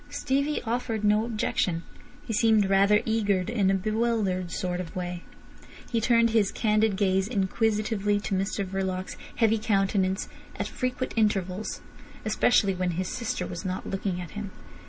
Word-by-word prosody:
Stevie 280 +2 -1
offered 230 -2 -2
no 210 +1 +3
objection. 190 -6 -1 0.4
He 225 - -3
seemed 220 -2 +4
rather 200 +2 +4
eager, 205 -4 +1
in 200 0 +1
a 195 - +3
bewildered 215 -3 0
sort 180 +1 -2
of 170 - -9
way. 180 -1 -4 0.7
He 230 -2 +1
turned 230 0 +4
his 215 -3 +3
candid 215 -2 +2
gaze 190 -1 +2
inquisitively 210 -1 0
to 200 - -3
Mr 195 +1 -1
Verloc's 185 -1 -3 0.2
heavy 225 -1 +3
countenance 195 -2 +1 0.3
at - - -3
frequent 255 0 -3
intervals, 205 -3 0 0.4
especially 215 -2 +3
when 180 -1 -1
his 185 0 -1
sister 235 -3 -3
was 170 - -6
not 185 0 -4
looking 190 -2 -2
at 175 -2 -7
him. 210 -1 -5
205 Hz, 150 wpm, -27 LUFS, 190-225 Hz, 0.7 s, seemed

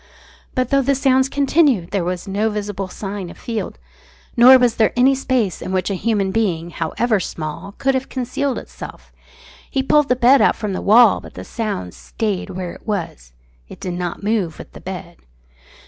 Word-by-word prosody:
But 255 -2 0
though 275 0 +4
the 275 +1 +1
sounds 265 0 +3
continued 280 - +2
there 195 -3 0
was 180 +1 -3
no 205 +3 0
visible 205 -2 -4
sign 195 -1 -6
of - - -12
Field, 220 - -4 0.6
nor 255 +2 +9
was 245 -2 +2
there 220 - +3
any 260 +2 +5
space 255 -8 -1
in - - -5
which 190 +1 0
a - - 0
human 200 -1 0
being, 175 -6 -1
however 205 +7 0
small, 165 +3 -6
could 270 +5 0
have 260 0 -2
concealed 260 +1 -2
itself. - - -10 0.6
He 270 -2 0
pulled 295 +1 +3
the 250 - +4
bed 255 +2 +5
out - - +4
from 210 -3 -4
the - - -3
wall, 220 0 +6
but - - -13
the - - -8
sound 205 - -4
stayed 210 -5 -3
where 180 -1 -5
it - - -16
was. 165 - -4 0.4
It - - -11
did 180 - -4
not 175 +1 -4
move 200 -7 0
with - - -11
the - - -11
bed. 180 -2 -7
210 Hz, 190 wpm, -20 LUFS, 185-255 Hz, 0.6 s, nor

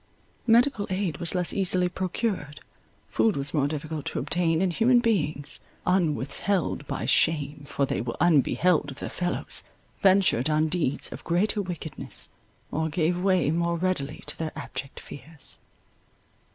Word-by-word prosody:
Medical 235 -1 +4
aid 185 -5 -1
was 170 +1 -4
less 180 -1 0
easily 185 -2 +2
procured, 180 -4 -3 0.5
food 220 -7 +2
was 140 +1 -2
more 145 -3 +2
difficult 155 0 -4
to - - -3
obtain, 165 -2 +1
and 185 -1 +1
human 240 +6 +4
beings, 160 - 0 0.3
unwithheld 170 -1 0
by - - -3
shame, 145 -3 +2
for 140 - 0
they 100 - -2
were 115 0 -4
unbeheld 165 0 +3
of 135 - -8
their - - -5
fellows, 175 0 -1 0.4
ventured 190 -9 +4
on 155 +1 +2
deeds 155 -5 0
of - - -8
greater 200 +5 +1
wickedness, 175 -4 -3 0.4
or 160 +1 -1
gave 170 +3 0
way 185 -5 +3
more 170 +1 0
readily 165 -5 -2
to - - -1
their 160 -1 -2
abject 135 - -6
fears. 150 0 -11
170 Hz, 145 wpm, -26 LUFS, 150-185 Hz, 0.5 s, Medical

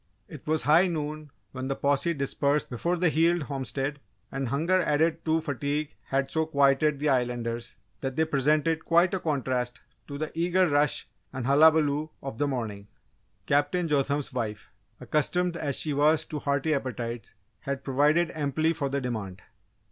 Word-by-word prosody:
It - - -12
was 155 0 +1
high 160 +5 +5
noon 155 -2 -4 0.2
when 130 0 -5
the 135 - -1
posse 145 +5 +1
dispersed 140 +1 0
before 170 +9 -1
the 175 0 +3
Heald 165 +2 +2
homestead, 140 +1 -3 0.3
and 135 -1 -2
hunger 165 +9 +2
added 160 +1 +1
to 160 0 +2
fatigue 145 +1 -2
had 135 0 -1
so 160 -1 0
quieted 140 0 +3
the 150 +2 0
Islanders 120 -2 -1 0.2
that 135 -1 -4
they 160 - +2
presented 155 +2 +1
quite 170 +3 +3
a 190 - 0
contrast 130 -6 -2 0.3
to 140 - -6
the 155 +1 -4
eager 180 +2 +2
rush 145 -2 +1 0.2
and 130 -2 -5
hullabaloo 150 +1 +4
of 135 -5 -6
the 145 - +2
morning. 110 -7 -4 0.6
Captain 165 +5 +1
Jotham's 145 -1 0
wife, 110 -5 -4 0.3
accustomed 175 +4 0
as 145 -5 -2
she 150 - -1
was 150 +2 +3
to 150 - -5
hearty 140 +2 0
appetites, 120 -5 -4 0.2
had 140 -2 -4
provided 150 +5 +2
amply 155 +2 0
for 145 -4 -2
the 140 +1 -1
demand. 100 -7 -5
145 Hz, 160 wpm, -27 LUFS, 135-160 Hz, 0.6 s, high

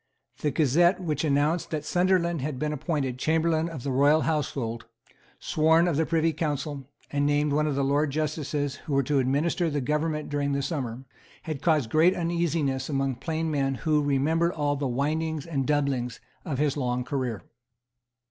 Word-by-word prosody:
The 150 - 0
Gazette 165 +6 +3
which 155 -5 -2
announced 150 +3 +1
that 155 -2 -3
Sunderland 175 -3 +1 0.2
been 150 +2 -2
appointed 135 -4 -2
Chamberlain 160 +2 +1
of 150 -7 -7
the 140 - -2
Royal 145 +4 +4
Household, 130 -8 -2 0.5
sworn 160 +2 +3
of 170 - +1
the 160 +2 +1
Privy 165 0 +2
Council, 145 -3 -3 0.2
and 145 0 0
named 145 0 +1
one 150 +1 +2
of 145 - -1
the 140 - +1
Lords 140 +1 +1
Justices 150 -2 -2
who 150 - -6
were 140 0 +3
to 140 +2 +1
administer 150 +6 +1
the 145 -1 -1
government 150 +3 -1
during 145 -1 -1
the 140 0 -1
summer 130 -6 -3 0.4
had 155 -4 -5
caused 150 -9 +2
great 165 +4 +4
uneasiness 165 -6 -1
among 135 -3 -1
plain 160 +4 -2
men 135 -2 0
who 150 +2 +1
remembered 155 +5 +1
all 145 -2 0
the 140 -1 -2
windings 150 +4 -1
and 140 -6 -2
doublings 140 -5 0 0.2
of 150 -7 -3
his 145 0 +1
long 125 -3 -1
career. 125 -5 -3
150 Hz, 170 wpm, -26 LUFS, 135-160 Hz, 0.5 s, Royal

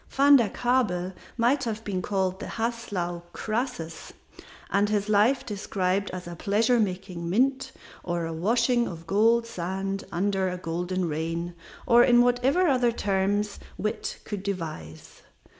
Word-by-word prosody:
Van 280 +1 +6
der 235 -6 +4
Kabel 200 -7 0 0.2
might 250 +4 +2
have 220 -1 -3
been 190 -4 -2
called 190 -1 -1
the - - -6
Haslau 215 -7 -3
Croesus 215 -8 -4 0.6
and 205 +1 +2
his 210 0 0
life 215 +6 +3
described 195 -2 -1
as 180 -1 -6
a 175 - -6
pleasure 220 +7 +2
making 185 -4 -2
mint, 260 +8 +1 0.3
or 175 -1 -2
a 165 - -4
washing 235 +7 +2
of 165 -2 -8
gold 225 +5 +3
sand 195 -1 -3
under 190 +1 0
a 180 - -4
golden 180 +1 -2
rain, 165 +2 -3 0.3
or 240 0 +6
in 240 -1 +6
whatever 245 +9 +2
other 250 -4 +3
terms 205 -1 0 0.2
wit 215 - -3
could 205 -3 -4
devise. 155 - -6
200 Hz, 140 wpm, -26 LUFS, 180-235 Hz, 0.6 s, Van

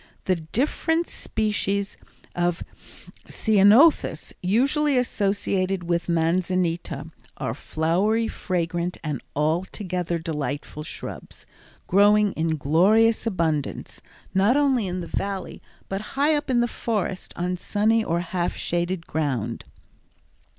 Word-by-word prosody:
The 185 -1 +2
different 290 - 0
species 200 -2 -2 0.4
of 175 -1 0 0.7
ceanothus 220 +9 +4
usually 270 - +2
associated 195 -5 0
with 170 0 -1
manzanita 170 -2 0 0.3
are 115 - -2
flowery 185 - 0
fragrant 175 -2 -2
and 150 -5 -3
altogether 175 +3 -1
delightful 150 -2 -4
shrubs, 150 - -8 0.4
growing 205 +2 +4
in 160 -1 -1
glorious 210 +11 +3
abundance, 160 -8 -2 0.3
not 200 +8 +4
only 265 -7 +2
in 180 0 -3
the - - -5
Valley, 195 0 -4 0.3
but 195 +1 -3 0.2
high 290 +3 +4
up 295 -2 -1
in 245 -2 +3
the 240 - +2
forest 210 -6 -3
on 180 +1 -1
sunny 220 +4 +1
or 170 -3 0
half 175 0 -2
shaded 175 0 -2
ground. 125 -8 -2
185 Hz, 110 wpm, -24 LUFS, 165-215 Hz, 0.7 s, ceanothus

